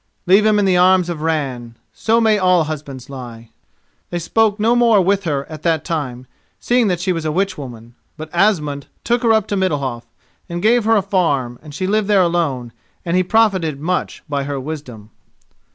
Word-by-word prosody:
"Leave 195 Hz, +4 st, +5 dB
him 215 Hz, -1 st, +3 dB
in 205 Hz, -, +2 dB
the 185 Hz, -1 st, +3 dB
arms 180 Hz, 0 st, +4 dB
of 160 Hz, -3 st, -6 dB
Ran. 135 Hz, -7 st, -2 dB, 0.2 s
So 225 Hz, +1 st, +1 dB
may 220 Hz, -2 st, +3 dB
all 180 Hz, -3 st, +3 dB
husbands 145 Hz, -4 st, -7 dB
lie." 120 Hz, -4 st, -10 dB, 0.6 s
They 175 Hz, -, -3 dB
spoke 210 Hz, +5 st, +1 dB
no 225 Hz, +3 st, +3 dB
more 235 Hz, -3 st, +4 dB
with 195 Hz, +1 st, +1 dB
her 140 Hz, -4 st, -1 dB
at 155 Hz, -2 st, -10 dB
that 160 Hz, -2 st, 0 dB
time, 130 Hz, -7 st, -4 dB, 0.3 s
seeing 240 Hz, -2 st, +2 dB
that 180 Hz, -3 st, 0 dB
she 180 Hz, +1 st, 0 dB
was 165 Hz, -2 st, -4 dB
a 155 Hz, -, -1 dB
witchwoman. 140 Hz, -, -4 dB, 0.2 s
But 155 Hz, 0 st, -8 dB
Asmund 155 Hz, -7 st, +1 dB, 0.2 s
took 240 Hz, 0 st, +1 dB
her 230 Hz, -, +3 dB
up 220 Hz, -2 st, +3 dB
to 205 Hz, -, 0 dB
Middalhof, 140 Hz, -11 st, -1 dB, 0.4 s
and 175 Hz, 0 st, -4 dB
gave 225 Hz, +4 st, +3 dB
her 225 Hz, 0 st, +4 dB
a 205 Hz, -, +2 dB
farm, 145 Hz, -11 st, 0 dB
and 150 Hz, -2 st, -11 dB
she 185 Hz, -, -2 dB
lived 210 Hz, +1 st, +1 dB
there 200 Hz, -3 st, +4 dB
alone, 145 Hz, -9 st, -1 dB, 0.3 s
and 170 Hz, 0 st, -1 dB
he 185 Hz, -, +4 dB
profited 185 Hz, -7 st, +1 dB
much 180 Hz, +4 st, -3 dB
by 140 Hz, -2 st, -2 dB
her 140 Hz, -1 st, -3 dB
wisdom. 130 Hz, -7 st, -8 dB
170 Hz, 195 wpm, -18 LUFS, 140-200 Hz, 0.6 s, Leave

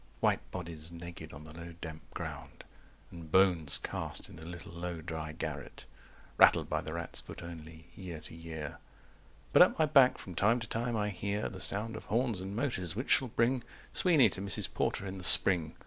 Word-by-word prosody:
White -, -, +1 dB
bodies 85 Hz, -2 st, -6 dB
naked 85 Hz, -2 st, -9 dB
on 70 Hz, +2 st, -10 dB
the 75 Hz, 0 st, -11 dB
low 85 Hz, +1 st, -9 dB
damp 80 Hz, -2 st, -7 dB
ground -, -, -7 dB, 0.5 s
And 85 Hz, -2 st, -10 dB
bones 90 Hz, -5 st, +4 dB
cast -, -, -4 dB
in 80 Hz, -, -12 dB
a 80 Hz, -, -10 dB
little 85 Hz, 0 st, -9 dB
low 85 Hz, 0 st, -5 dB
dry 80 Hz, -1 st, -5 dB
garret, 80 Hz, -, -6 dB, 0.5 s
Rattled -, -, +6 dB
by -, -, -1 dB
the 80 Hz, -, -6 dB
rat's 85 Hz, 0 st, -3 dB
foot -, -, -10 dB
only, 80 Hz, -1 st, -10 dB
year 90 Hz, -5 st, -7 dB
to 75 Hz, -, -10 dB
year. 80 Hz, -2 st, -7 dB, 0.7 s
195 -, -, -23 dB
But -, -, +7 dB
at -, -, +6 dB
my 160 Hz, -, +4 dB
back 140 Hz, -4 st, +5 dB
from 95 Hz, -, -9 dB
time 110 Hz, +8 st, +3 dB
to 115 Hz, -, -5 dB
time 115 Hz, +1 st, -2 dB
I 105 Hz, 0 st, 0 dB
hear 100 Hz, +2 st, -3 dB
The 95 Hz, -, -9 dB
sound 110 Hz, +3 st, 0 dB
of -, -, -8 dB
horns 115 Hz, -4 st, 0 dB
and 95 Hz, +2 st, -6 dB
motors, 95 Hz, -, -2 dB
which 125 Hz, +5 st, -3 dB
shall 130 Hz, -, +4 dB
bring 120 Hz, +2 st, +1 dB, 0.3 s
Sweeney 155 Hz, -, +5 dB
to 95 Hz, -, -3 dB
Mrs. 100 Hz, -1 st, -2 dB
Porter -, -, -1 dB
in 95 Hz, 0 st, -6 dB
the -, -, -8 dB
spring. 85 Hz, -4 st, +7 dB
90 Hz, 200 wpm, -32 LUFS, 80-105 Hz, 0.7 s, But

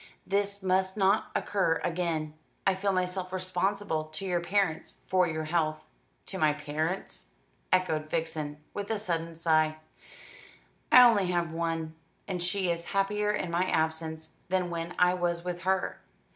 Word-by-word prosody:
"This 200 Hz, 0 st, 0 dB
must 190 Hz, +1 st, +1 dB
not 195 Hz, +1 st, +3 dB
occur 190 Hz, -5 st, +1 dB
again. 165 Hz, -3 st, -1 dB, 0.3 s
I 195 Hz, -, +4 dB
feel 195 Hz, +1 st, 0 dB
myself 185 Hz, 0 st, -1 dB
responsible 185 Hz, -2 st, -1 dB
to 155 Hz, +5 st, -6 dB
your 175 Hz, -2 st, 0 dB
parents 185 Hz, -2 st, -1 dB
for 185 Hz, -1 st, +3 dB
your 155 Hz, -1 st, -2 dB
health." 155 Hz, -1 st, 0 dB, 0.4 s
"To 190 Hz, -, -4 dB
my 155 Hz, -2 st, +4 dB
parents," 150 Hz, -, -3 dB, 0.4 s
echoed 160 Hz, -4 st, +1 dB
Vixen, 155 Hz, -3 st, -2 dB, 0.2 s
with 205 Hz, -1 st, -4 dB
a 220 Hz, -, +1 dB
sudden 170 Hz, -5 st, -2 dB
sigh; 155 Hz, -1 st, +2 dB, 1.1 s
"I -, -, +6 dB
have 250 Hz, 0 st, +11 dB
only 195 Hz, -5 st, +1 dB, 0.2 s
one, 165 Hz, -1 st, -2 dB, 0.3 s
and 185 Hz, -3 st, -2 dB
she 180 Hz, 0 st, +2 dB
is 170 Hz, 0 st, -3 dB
happier 210 Hz, +1 st, +1 dB
in 195 Hz, -4 st, -1 dB
my 175 Hz, +2 st, +2 dB
absence 160 Hz, -1 st, -1 dB, 0.2 s
than 180 Hz, -1 st, 0 dB
when 170 Hz, +1 st, -4 dB
I 180 Hz, 0 st, +5 dB
was 175 Hz, -1 st, -1 dB
with 175 Hz, -1 st, -3 dB
her. 190 Hz, 0 st, 0 dB
175 Hz, 150 wpm, -29 LUFS, 160-190 Hz, 1.1 s, have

